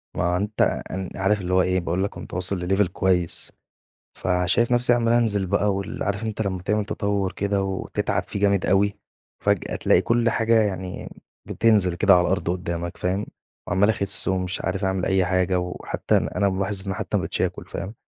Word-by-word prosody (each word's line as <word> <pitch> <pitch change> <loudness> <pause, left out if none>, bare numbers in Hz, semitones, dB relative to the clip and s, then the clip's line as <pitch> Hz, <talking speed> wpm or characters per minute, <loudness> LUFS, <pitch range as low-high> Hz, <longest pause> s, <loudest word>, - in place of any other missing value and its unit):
ما 90 +1 +1
أنت 105 +3 -2 0.3
إن 95 -1 -4
عارف 100 +2 +1
اللي 90 0 -2
هو 95 - +5
إيه، 90 0 +1
باقول 90 +2 -1
لك 100 - -1
كُنت - - -11
واصل 90 0 +1
لLevel 95 +1 +2
كويّس 90 -2 0 0.7
فشايف 90 +6 +1
نفسي 120 0 +4
عمّال 115 -1 +1
أنزل 110 -5 +2
بقى 100 +2 +1
وال 100 0 -4
عارف 100 +2 -2
أنت 110 0 -2
لمّا 95 -3 -3
تعمل 105 +2 0
تطور 100 -2 -1
كده 100 +1 -1
وتتعب 95 -1 -2
فيه 100 - -6
جامد 100 -2 +2
أوي، 100 +2 +3 0.5
وفجأة - - 0
تلاقي - - +3
كل 115 0 +1
حاجة 115 0 +3
يعني 95 -3 -4 0.4
بتنزل 105 -6 +2
كده 100 +2 +5
على 90 - +4
الأرض 95 -2 0
قدّامك 85 -1 -4
فاهم، 95 +3 -2 0.4
عمّال 95 +4 +3
أخِسّ 100 -2 +3
ومش 95 -1 -1
عارف 95 +2 -2
أعمل 95 -1 0
أي 95 -1 +2
حاجة 90 0 +1
وحتى 90 0 -2
أن - - 0
أنا 100 - 0
ملاحظ 95 +1 -2
إن 95 - -1
حتى 105 0 -2
ما - - +1
بقيتش 80 - -2
آكُل، - - -2
فاهم، 100 +4 -6
95 Hz, 190 wpm, -23 LUFS, 90-105 Hz, 0.7 s, هو